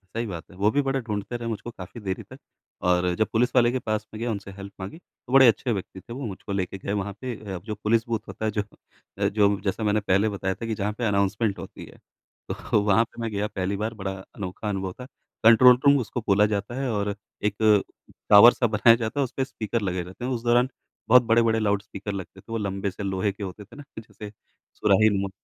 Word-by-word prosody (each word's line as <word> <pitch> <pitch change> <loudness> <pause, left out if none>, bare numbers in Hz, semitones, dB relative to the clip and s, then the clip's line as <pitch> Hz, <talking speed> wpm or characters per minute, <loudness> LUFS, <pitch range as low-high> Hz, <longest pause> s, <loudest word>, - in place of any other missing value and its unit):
सही 115 +1 -1
बात 85 -5 -6
है। - - -15
वो 100 +2 +3
भी 145 - +2
बड़ा 135 -1 -1
ढूँढ़ते 105 -1 -4
रहे 120 -1 -5
मुझको 115 +1 -5
काफ़ी 95 +2 -10
देरी 95 -2 -4
तक - - -14 0.5
और 90 0 +2
जब 110 - +1
पुलिस 125 +3 +2
वाले 120 -1 +5
के 130 - -1
पास 110 -2 -2
में 110 - -7
गया 120 +1 -1
उनसे 100 -2 -6
हेल्प 100 +1 -10
माँगी। 95 +11 -7
तो 130 -7 -14
बड़े 135 -2 +8
अच्छे 120 +2 +2
व्यक्ति 95 -2 -4
थे 120 - -10
वो 135 +1 -5
मुझको 100 -1 -7
लेके 95 -1 -2
गए 100 +1 -4
वहाँ 100 -1 -2
पे 125 -2 -4 0.2
अ, - - -3
जो 105 +4 -6
पुलिस 110 +2 +1
बूथ 115 -2 -1
होता 110 - -5
है 110 - +1
जो 105 0 0 0.6
अ, - - +1
जो 100 -1 +2
जैसा 100 +3 -2
मैंने 105 0 +2
पहले 100 +1 +2
बताया 95 -2 -2
था 115 - -6
कि 115 -1 -2
जहाँ 105 +1 -2
पे 120 - -1
अनाउंसमेंट 100 +1 +1
होती - - -9
है, - - -16 0.5
तो 105 - 0
वहाँ 105 +2 +4
पे 120 - -11
मैं 115 - -2
गया 105 0 -1
पहली 95 -1 -2
बार 110 +2 -2
बड़ा 95 -3 -4 0.2
अनोखा 100 +2 -5
अनुभव 95 -2 -3
था। 125 - -7 0.4
कंट्रोल 120 +2 +8
रूम 140 0 +7
उसको 120 +1 -4
बोला 100 +1 +5
जाता 105 +2 -2
है 135 - -1
और 100 -1 -1 0.3
एक 105 -1 +1 0.7
टावर 105 +4 +9
सा 120 - +1
बनाया 110 +2 +5
जाता 115 +4 -3
है - - +4
और - - +2
उसपे 130 +1 -3
स्पीकर 115 -2 -3
लगे 90 -3 -1
रहते 95 +7 -8
हैं। 130 - -2
उस 120 -2 -3
दौरान 120 +1 +3 0.4
बहुत 125 +1 +8
बड़े-बड़े 115 -1 +3
लाउडस्पीकर 100 -1 -2
लगते 95 0 -7
थे, - - -42
वो 115 - -1
लंबे 100 -1 -2
से 95 - -7
लोहे 95 +1 0
के 100 +1 -9
होते 95 +2 -7
थे - - -16
ना 145 - -10
कि - - -6
जैसे 105 -1 -11 0.4
सुराहीनुमा। 100 -1 +3
105 Hz, 240 wpm, -25 LUFS, 100-115 Hz, 0.7 s, टावर